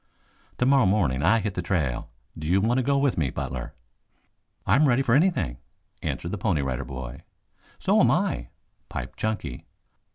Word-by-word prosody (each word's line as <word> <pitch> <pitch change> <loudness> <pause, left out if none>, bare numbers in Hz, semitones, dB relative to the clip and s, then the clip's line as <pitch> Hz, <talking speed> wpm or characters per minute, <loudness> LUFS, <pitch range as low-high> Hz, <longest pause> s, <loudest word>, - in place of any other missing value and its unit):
"Tomorrow 130 -3 +4
morning 90 -10 +2
I 95 +9 +4
hit 100 -1 -2
the 90 - -2
trail. 80 -9 -1 0.3
Do 75 - -6
you 90 +4 +3
want 115 +5 +2
to - - +1
go 140 +2 +2
with 140 -8 +1
me, 70 -4 +1
Butler?" 65 -1 -5 0.9
"I 100 - +4
am 150 +3 +5
ready 130 +1 +3
for 115 - +2
anything," 135 - +2 0.4
answered 85 - -3
the 105 - -4
Pony 90 -8 +1
Rider 65 0 -2
Boy. 65 -1 -7 0.6
"So - - +2
am - - +5
I," - - 0 0.4
piped - - -6
Chunky. 110 - -3
95 Hz, 170 wpm, -26 LUFS, -, 0.9 s, am